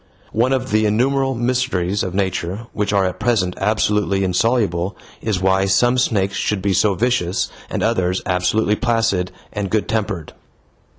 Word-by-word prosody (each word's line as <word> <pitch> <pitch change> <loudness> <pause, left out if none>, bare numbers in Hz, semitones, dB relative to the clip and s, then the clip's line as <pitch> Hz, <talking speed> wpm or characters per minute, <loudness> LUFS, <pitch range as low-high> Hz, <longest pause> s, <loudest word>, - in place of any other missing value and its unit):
One 120 +4 +2
of 130 -1 -1
the 110 0 +3
innumerable 135 +5 +1
mysteries 120 -6 0
of 90 -1 -3
nature 95 +2 -2
which 105 -1 -1
are 100 -2 +2
at 90 - -3
present 100 -7 +1
absolutely 105 -1 +1
insoluble 95 -1 0 0.2
is 105 -4 -1
why 95 0 +3
some 120 +6 +3
snakes 100 -6 +1
should 105 - 0
be 100 -1 +1
so 100 +1 +2
vicious 95 -5 0 0.2
and - - -2
others 95 -5 +1
absolutely 105 +4 +1
placid 115 -7 0 0.2
and 100 -2 -3
good 110 +2 0
tempered. 105 -7 -2
105 Hz, 155 wpm, -20 LUFS, 95-115 Hz, 0.2 s, the